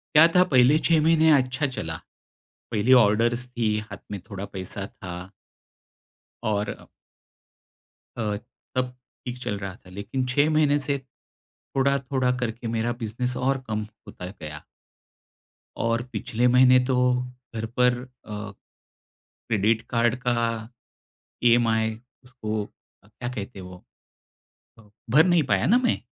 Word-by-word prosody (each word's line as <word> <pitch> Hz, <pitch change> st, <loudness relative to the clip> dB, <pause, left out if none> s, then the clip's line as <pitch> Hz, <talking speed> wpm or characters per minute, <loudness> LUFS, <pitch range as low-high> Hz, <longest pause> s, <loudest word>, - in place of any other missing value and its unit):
क्या 160 Hz, +2 st, +9 dB
था 180 Hz, -, +8 dB
पहले 130 Hz, +3 st, +6 dB
6 165 Hz, -2 st, +4 dB
महीने 160 Hz, -1 st, +5 dB
अच्छा 130 Hz, +2 st, 0 dB
चला। 80 Hz, -11 st, -5 dB, 0.8 s
पहले 115 Hz, +4 st, +3 dB
ऑर्डर्स 120 Hz, +1 st, +4 dB
थी, 115 Hz, -4 st, 0 dB
हाथ 105 Hz, -1 st, -8 dB
में 100 Hz, -, -4 dB
थोड़ा 100 Hz, -1 st, -5 dB
पैसा 95 Hz, +1 st, -5 dB
था। 90 Hz, 0 st, -9 dB, 1.1 s
और 105 Hz, -1 st, -2 dB, 1.3 s
अ, 105 Hz, -3 st, -1 dB, 0.4 s
तब 125 Hz, -1 st, -1 dB, 0.3 s
ठीक 125 Hz, 0 st, -4 dB
चल 100 Hz, -, -2 dB
रहा 95 Hz, -1 st, -5 dB
था। 90 Hz, -, -18 dB
लेकिन 105 Hz, +7 st, -3 dB
6 145 Hz, +4 st, +3 dB
महीने 150 Hz, -2 st, +3 dB
से 140 Hz, 0 st, -1 dB, 0.8 s
थोड़ा-थोड़ा 135 Hz, -1 st, +1 dB
करके 120 Hz, -1 st, -3 dB
मेरा 115 Hz, +1 st, 0 dB
बिज़नेस 125 Hz, +3 st, -2 dB
और 135 Hz, +1 st, 0 dB
कम 110 Hz, -1 st, -2 dB, 0.2 s
होता 95 Hz, -3 st, -8 dB
गया। 75 Hz, -1 st, -7 dB, 1.2 s
और 115 Hz, +1 st, +1 dB
पिछले 125 Hz, -1 st, 0 dB
महीने 125 Hz, +1 st, +6 dB
तो 130 Hz, 0 st, +1 dB, 0.6 s
घर 110 Hz, 0 st, -2 dB
पर 125 Hz, 0 st, +4 dB, 0.3 s
अ, 105 Hz, -1 st, -6 dB, 1.0 s
क्रेडिट 110 Hz, +1 st, +2 dB
कार्ड 120 Hz, 0 st, +2 dB
का 120 Hz, -1 st, +2 dB, 1.1 s
ईएमआई 110 Hz, -2 st, +3 dB, 0.2 s
उसको 110 Hz, -4 st, -4 dB, 0.4 s
क्या 120 Hz, +4 st, -7 dB
कहते 100 Hz, -5 st, -6 dB
हैं 90 Hz, -, -8 dB
वो? 90 Hz, -1 st, -12 dB, 1.0 s
अ, 105 Hz, -2 st, -19 dB, 0.2 s
भर 150 Hz, +5 st, +7 dB
नहीं 175 Hz, -3 st, +4 dB
पाया 95 Hz, +1 st, +2 dB
ना 235 Hz, +6 st, +5 dB
मैं, -, -, +2 dB
120 Hz, 130 wpm, -25 LUFS, 105-130 Hz, 1.3 s, क्या